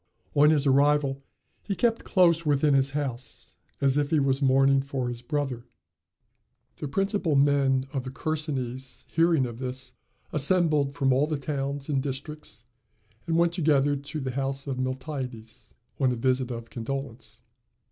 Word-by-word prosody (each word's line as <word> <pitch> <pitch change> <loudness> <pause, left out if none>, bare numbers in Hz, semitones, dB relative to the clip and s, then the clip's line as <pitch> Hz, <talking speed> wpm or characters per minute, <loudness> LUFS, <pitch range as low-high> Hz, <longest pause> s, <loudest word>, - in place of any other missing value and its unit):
On 150 +1 +6
his 150 -2 +3
arrival 140 0 +3 0.4
he 200 - -3
kept 230 +3 +1
close 170 -3 +3
within 145 -1 +2
his 135 0 +3
house, 135 -3 -5 0.2
as 140 +1 +2
if 145 -1 0
he 155 - +3
was 135 0 +1
mourning 135 0 +4
for 135 -2 -3
his 120 -1 -6
brother. 130 -3 -3 1.1
The 150 - -4
principal 195 0 0
men 135 -2 +3
of 135 -3 -2
the 130 - -5
Chersonese, 130 -4 -4
hearing 165 -4 +3
of 120 -1 -7
this, 130 -1 -5 0.4
assembled 150 -2 +2
from 135 -1 +2
all 140 +4 +2
the 155 -1 -1
towns 140 0 -3
and 140 -3 0
districts, 135 -4 -6 0.6
and 165 0 +1
went 170 0 +3
together 145 -4 +2
to 140 +2 -6
the 130 -2 -3
house 135 +1 -2
of 135 -3 -3
Miltiades, 130 -3 -5 0.2
on 130 -2 +3
a - - -1
visit 130 +1 0
of 115 -1 -7
condolence. 115 -3 -5
140 Hz, 155 wpm, -27 LUFS, 130-150 Hz, 1.1 s, On